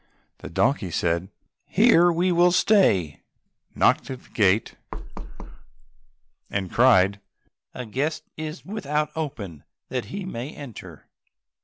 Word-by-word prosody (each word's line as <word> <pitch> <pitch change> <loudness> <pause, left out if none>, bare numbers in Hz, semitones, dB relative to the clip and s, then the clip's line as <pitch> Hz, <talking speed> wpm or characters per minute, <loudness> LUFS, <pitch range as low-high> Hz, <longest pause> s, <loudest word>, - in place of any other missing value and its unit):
The - - -9
donkey 115 - +1
said, 85 +2 -1 0.4
"Here 180 -5 +5
we 175 +2 +1
will 175 +1 +4
stay," 175 - +3 0.5
knocked - - +2
at 130 -1 -7
the - - -21
gate, 105 0 +2 1.7
and 95 -3 -3
cried, 100 -5 +4 0.5
"A 125 - -5
guest 140 +8 -2
is 155 +2 -7
without 150 -7 -2
open, 105 - -5 0.3
that 125 -2 -3
he 195 -1 -6
may 135 -4 -6
enter." 100 - -11
130 Hz, 115 wpm, -24 LUFS, -, 1.7 s, Here